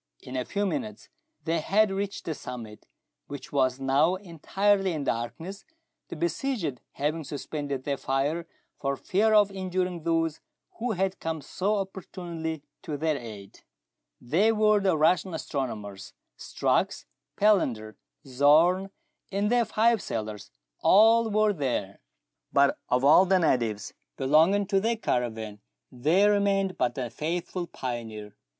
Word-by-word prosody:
In 130 - -8
a 125 -1 -1
few 205 0 -1
minutes 215 -1 -4 0.3
they 165 0 0
had 205 +5 +2
reached 200 +1 -3
the 160 - -2
summit, 120 -6 -9 0.4
which 140 -1 -8
was 130 -2 +1
now 140 +6 +3
entirely 195 +2 0
in 150 -3 -3
darkness, 160 - -4 0.4
the - - -7
besieged 170 - -2
having 155 +3 -2
suspended 140 -1 -5
their 140 0 -2
fire 145 +6 -1 0.3
for 140 -1 -1
fear 215 +2 +2
of 205 -1 +5
injuring 185 -2 -2
those 165 -1 0 0.4
who 240 0 -1
had 190 0 -1
come 160 -1 -3
so 190 +8 -1
opportunely 170 -5 -5 0.2
to 150 -2 -4
their 155 +1 0
aid. 110 -6 -9 0.6
They 165 - +2
w^ere 215 -1 +3
the 190 -4 +2
Russian 175 +3 +2
astronomers. 105 -10 -5 0.2
Strux, - - -1 0.3
Palander, 125 - +2 0.3
Zorn, 155 +8 +4 0.4
and 200 +2 0
their 240 -1 +3
five 225 0 +2
sailors, 105 -2 -5 0.3
all 225 +3 +5
were 215 0 +3
there: 125 - -2 0.5
but 140 0 +3
of 125 +2 +2
all 160 +6 +7
the 190 0 +4
natives 120 - 0 0.2
belonging 160 +9 +4
to 195 0 +2
their 225 +3 0
caravan 110 - -2 0.3
there 170 +11 +3
remained 195 -2 +1
but 125 -1 0
the 125 -4 -4
faithful 175 +5 -3
pioneer. 115 -7 -6
165 Hz, 135 wpm, -27 LUFS, 135-195 Hz, 0.6 s, all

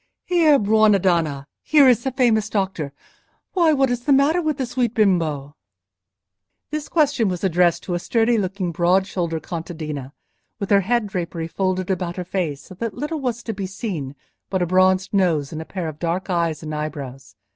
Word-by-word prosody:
Here, 325 -5 +4
buona 215 -2 +4
donna! 165 -7 0 0.2
here 295 -3 +5
is 240 -2 +4
the 265 - -1
famous 230 -5 +2
doctor. 190 -9 -2 0.6
Why, 340 -4 +4
what 270 -4 +2
is 245 0 -3
the 290 - +2
matter 285 +6 +4
with 310 -4 -1
the 265 - -1
sweet 245 -1 -1
bimbo?" 160 -9 +1 1.2
This 305 -1 -4
question 290 -8 +2
was 180 0 -4
addressed 175 -2 +2
to 180 - -4
a 175 - 0
sturdy 230 +4 +2
looking, 185 -2 -2
broad 180 +3 +2
shouldered 170 -4 -3
contadina, 155 -5 -6 0.5
with 200 - -4
her 200 -1 +6
head 235 +3 +1
drapery 175 -4 -4
folded 185 +1 -1
about 175 -2 -2
her 180 - -5
face 170 -6 -2
so - - -12
that 220 +2 -4
little 300 +2 -3
was 240 -3 -3
to 225 - -4
be 195 -1 -4
seen 180 - -5 0.3
but 190 -2 0
a - - +1
bronzed 185 +2 +2
nose 165 -8 +1
and 160 -1 -5
a - - -8
pair 180 -2 -4
of 155 -1 -7
dark 175 +3 -2
eyes 165 -3 0
and 155 0 -5
eyebrows. 135 -5 -6
190 Hz, 190 wpm, -22 LUFS, 165-235 Hz, 1.2 s, her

